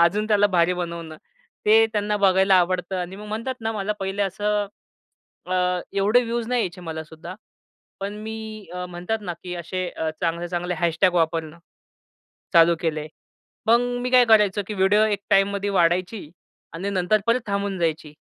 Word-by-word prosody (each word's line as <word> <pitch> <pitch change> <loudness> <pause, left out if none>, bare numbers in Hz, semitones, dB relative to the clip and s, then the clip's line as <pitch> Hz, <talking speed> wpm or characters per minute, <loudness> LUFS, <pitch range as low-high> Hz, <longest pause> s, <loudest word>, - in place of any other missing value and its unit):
अजून 200 +5 +3
त्याला 205 -1 +4
भारी 180 -2 +2
बनवणं, 170 -2 -5 0.5
ते 220 +1 +7
त्यांना 210 0 0
बघायला 190 -1 +4
आवडतं 180 +1 +1
आणि 180 +1 -4
मग 210 +1 -9
म्हणतात 230 +5 -3
ना, 225 0 -2
मला 210 -1 -2
पहिले 195 +1 -1
असं 205 +2 -1 0.8
अ, 180 0 +1
एवढे 200 +4 +4
व्हियूज 235 0 -3
नाही 250 0 +1
यायचे 180 -2 -4
मला 160 -2 -5
सुद्धा. 160 +3 -10 0.7
पण 200 +1 -4
मी 220 -1 -7
अ, 180 0 -4
म्हणतात 180 +5 -3
ना, 180 -4 -4
की 180 -1 -5
अशे 180 +1 -4
अ, 160 -1 -3
चांगले-चांगले 175 +1 -2
हॅशटॅग 170 +2 +2
वापरणं, 165 -1 0 1.0
चालू 170 -1 +6
केले. 155 -2 -2 0.6
मग 235 +2 +5 0.2
मी 250 - -2
काय 250 -1 +6
करायचो? 210 -3 +4
की 215 - -4
व्हिडिओ 205 +2 +3
एक 205 -2 0
टाईममध्ये 200 +1 +2
वाढायची 180 0 +1 0.4
आणि 185 +5 -3
नंतर 200 +2 +1
परत 235 +2 +3
थांबून 200 -1 -2
जायची. 160 -2 -2
190 Hz, 160 wpm, -23 LUFS, 175-210 Hz, 1.0 s, ते